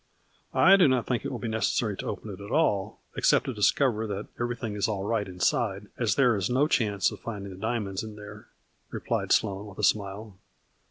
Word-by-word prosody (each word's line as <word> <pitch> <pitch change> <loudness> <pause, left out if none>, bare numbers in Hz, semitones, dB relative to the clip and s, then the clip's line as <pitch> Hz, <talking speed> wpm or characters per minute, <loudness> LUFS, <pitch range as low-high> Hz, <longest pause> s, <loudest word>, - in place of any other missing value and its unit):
" - - -37
I 195 +1 +7
do 180 -5 +6
not 130 -3 +2
think 125 -3 -1
it - - -4
will - - -3
be 120 - -5
necessary 110 -1 0
to - - -5
open 105 +1 -5
it 100 +3 -9
all, 105 -12 +1
except - - +3
to 130 - -3
discover 110 +2 +2
that 100 0 -4
everything 120 -2 -3
is 105 -1 0
all 100 -3 -2
right 105 -1 -1
inside, 90 -1 -1
as - - 0
there 125 -5 +4
is 100 +2 -1
no 130 +4 +3
chance 105 - +1
of - - -9
finding 100 -4 -6
the 90 - -12
diamonds 105 -4 -2
in 110 -1 -8
there," 105 -1 -11 0.4
replied - - -2
Sloane 100 -1 +1
with 100 - -12
a - - -4
smile. 100 -1 0
105 Hz, 210 wpm, -27 LUFS, 100-120 Hz, 0.4 s, I